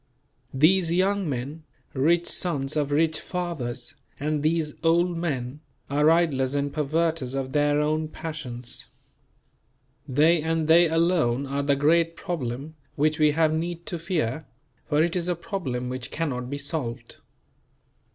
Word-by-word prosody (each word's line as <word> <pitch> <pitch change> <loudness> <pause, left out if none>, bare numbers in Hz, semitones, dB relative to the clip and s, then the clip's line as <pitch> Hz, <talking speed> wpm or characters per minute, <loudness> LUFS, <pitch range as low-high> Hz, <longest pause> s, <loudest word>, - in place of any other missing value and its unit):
These 165 +4 +4
young 190 0 +1
men, 140 +4 -4 0.3
rich 165 +6 +2
sons 145 -6 0
of 145 -2 0
rich 155 +2 +2
fathers, 145 -10 -4 0.3
and 150 +1 -1
these 155 -1 0
old 170 +2 +3
men, 145 -5 -3 0.3
are 150 +2 +4
idlers 145 -6 +2
and 140 0 -1
perverters 155 -2 0
of 135 -1 -3
their 145 +1 +2
own 155 +1 0
passions. 125 -7 -6 1.2
They 155 +5 +4
and 160 0 0
they 165 +1 +6
alone 160 -6 +2
are 140 +1 -2
the 140 0 +2
great 165 +4 +3
problem 145 -5 -4 0.2
which 155 +1 +1
we 150 -1 +4
have 160 0 +3
need 170 +1 -3
to 180 -6 -3
fear; 155 -5 -2 0.4
for 150 +1 +3
it 170 +1 0
is 175 -1 -1
a 180 - +1
problem 155 - -4
which 130 0 -4
cannot 125 -6 -3
be 140 - -3
solved. 135 -5 -4
155 Hz, 140 wpm, -25 LUFS, 135-165 Hz, 1.2 s, they